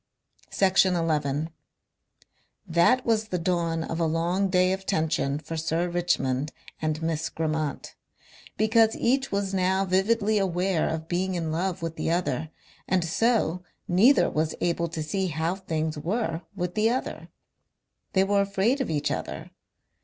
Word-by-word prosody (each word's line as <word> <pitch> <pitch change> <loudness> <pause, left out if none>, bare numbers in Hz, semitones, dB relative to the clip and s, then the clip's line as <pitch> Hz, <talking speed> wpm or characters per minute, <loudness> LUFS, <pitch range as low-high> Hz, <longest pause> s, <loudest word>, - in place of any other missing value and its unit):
Section 190 -1 +3
11 155 -2 0 1.1
That 175 +9 +3
was 220 -2 +1
the 185 - -2
dawn 170 -2 0
of 165 +1 -4
a 165 - +2
long 175 +5 0
day 185 0 +3
of 190 0 -4
tension 155 -6 0
for 165 +2 -6
Sir 160 +2 0
Richmond 155 -6 0 0.3
and 155 0 -1
Miss 160 0 -1
Grammont. 155 -2 -3 0.6
Because 220 +1 +4
each 265 +3 +1
was 200 -1 -1
now 190 +1 +2
vividly 205 +3 +2
aware 185 -2 0
of 160 0 -4
being 185 +2 -1
in 165 -2 -2
love 175 +1 -2
with 165 -1 -4
the - - -1
other 160 -3 -1 0.4
and 180 -2 +1
so 185 -1 +1 0.3
neither 215 +11 +5
was 155 +1 -1
able 170 0 0
to 160 -1 -4
see 190 +5 -1
how 160 +1 -1
things 160 -5 -3
were 170 0 -2
with 180 -2 -3
the 215 +3 +2
other. 255 +2 -3 0.8
They 190 - +4
were 200 +1 +2
afraid 200 +7 +1
of 265 - -2
each 145 -2 0
other. - - -5
175 Hz, 150 wpm, -26 LUFS, 160-195 Hz, 1.1 s, neither